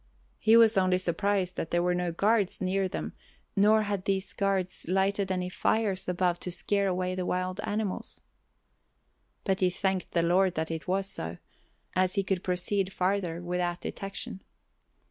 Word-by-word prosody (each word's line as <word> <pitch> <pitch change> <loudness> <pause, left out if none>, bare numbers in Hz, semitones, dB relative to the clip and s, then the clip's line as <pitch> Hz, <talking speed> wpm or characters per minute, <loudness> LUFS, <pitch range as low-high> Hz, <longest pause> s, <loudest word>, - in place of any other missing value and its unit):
He 225 +1 +6
was 225 -3 +6
only 185 -1 +3
surprised 185 +1 0
that 165 - -3
there 175 0 +1
were 180 0 +2
no 180 -1 -1
guards 205 +3 +1
near 190 +1 0
them - - -5 0.4
nor 215 +2 +5
had 200 -3 -2
these 195 0 -1
guards 195 -4 -1
lighted 195 +1 +1
any 180 -1 -1
fires 195 0 0
above 180 -1 +1
to 180 - -4
scare 200 +3 +1
away 185 0 -1
the 185 0 -2
wild 185 +1 -2
animals. 210 -2 -3 1.2
But 190 -2 0
he 185 - +3
thanked 190 +1 -2
the 170 - +2
Lord 180 +2 +3
that 160 +1 -2
it 165 +1 -5
was 190 +1 +1
so, 85 - -5 0.6
as 185 0 +2
he 195 - +2
could 190 -1 -1
proceed 185 +2 0
farther 180 -3 -1
without 175 0 -1
detection. 195 -1 -5
185 Hz, 165 wpm, -29 LUFS, 180-195 Hz, 1.2 s, He